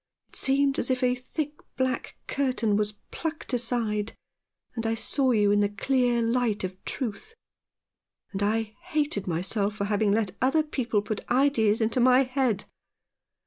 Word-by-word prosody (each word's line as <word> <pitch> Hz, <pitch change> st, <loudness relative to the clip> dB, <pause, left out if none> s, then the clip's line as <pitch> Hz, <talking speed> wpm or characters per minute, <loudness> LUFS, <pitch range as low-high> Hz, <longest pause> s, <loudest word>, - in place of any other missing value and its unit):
It -, -, -17 dB
seemed 275 Hz, +1 st, +2 dB
as -, -, 0 dB
if 255 Hz, 0 st, 0 dB
a 250 Hz, 0 st, +4 dB
thick 295 Hz, +4 st, -5 dB, 0.2 s
black 260 Hz, 0 st, -1 dB
curtain 250 Hz, -6 st, 0 dB
was 210 Hz, 0 st, 0 dB, 0.2 s
plucked 320 Hz, -4 st, -4 dB
aside, 230 Hz, -3 st, 0 dB, 0.6 s
and 230 Hz, -1 st, -2 dB
I 225 Hz, -, +1 dB
saw 265 Hz, +4 st, +1 dB
you 210 Hz, -4 st, +4 dB
in 205 Hz, -, +4 dB
the 205 Hz, 0 st, +2 dB
clear 245 Hz, +2 st, +1 dB
light 230 Hz, -3 st, +1 dB
of 185 Hz, 0 st, -5 dB
truth; 265 Hz, -, -4 dB, 1.0 s
and 195 Hz, -, -4 dB
I 215 Hz, +1 st, 0 dB
hated 300 Hz, -, -1 dB
myself 200 Hz, +5 st, -1 dB
for 200 Hz, -2 st, -2 dB
having 205 Hz, 0 st, +1 dB
let 205 Hz, -2 st, 0 dB
other 270 Hz, +5 st, +3 dB
people 235 Hz, -8 st, -1 dB
put 215 Hz, 0 st, -4 dB
ideas 240 Hz, -5 st, +3 dB
into 225 Hz, +3 st, +1 dB
my 255 Hz, +2 st, +6 dB
head. 255 Hz, -5 st, 0 dB
235 Hz, 155 wpm, -27 LUFS, 210-265 Hz, 1.0 s, my